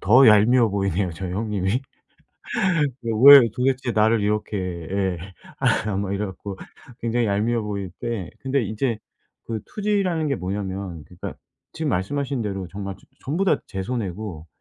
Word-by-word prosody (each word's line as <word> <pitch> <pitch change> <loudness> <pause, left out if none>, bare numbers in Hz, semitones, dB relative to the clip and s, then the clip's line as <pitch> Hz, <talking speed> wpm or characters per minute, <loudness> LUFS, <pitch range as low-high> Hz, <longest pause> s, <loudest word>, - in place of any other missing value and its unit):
더 125 +8 +6
얄미워 115 +3 +6
보이네요, 95 -2 0
저희 90 +2 -5
형님이. 105 +2 -1 1.5
왜 140 0 +13
도대체 130 0 0
나를 110 +1 +3
이렇게 105 0 -1 0.3
예. 95 -2 0 0.4
아 105 -2 +1
막 100 0 -2
이래 105 +1 -1
갖고 95 0 -7 0.4
굉장히 120 0 0
얄미워 110 +3 +1
보일 100 -3 -4
때 110 -7 -3
근데 135 0 0
이제 110 +2 -1 0.5
그 110 -1 -3
투지라는 195 -7 0
게 140 - +1
뭐냐면 95 -2 -4
그러니까 90 0 -8 0.4
지금 160 -2 -2
말씀하신 130 +6 -1
대로 95 -3 -3
정말 100 +1 -6
전 - - -24 0.2
전부 165 +9 -1
다 - - +4
제 95 -1 -4
손해고 100 -7 -4
105 Hz, 300 characters per minute, -23 LUFS, 95-125 Hz, 1.5 s, 왜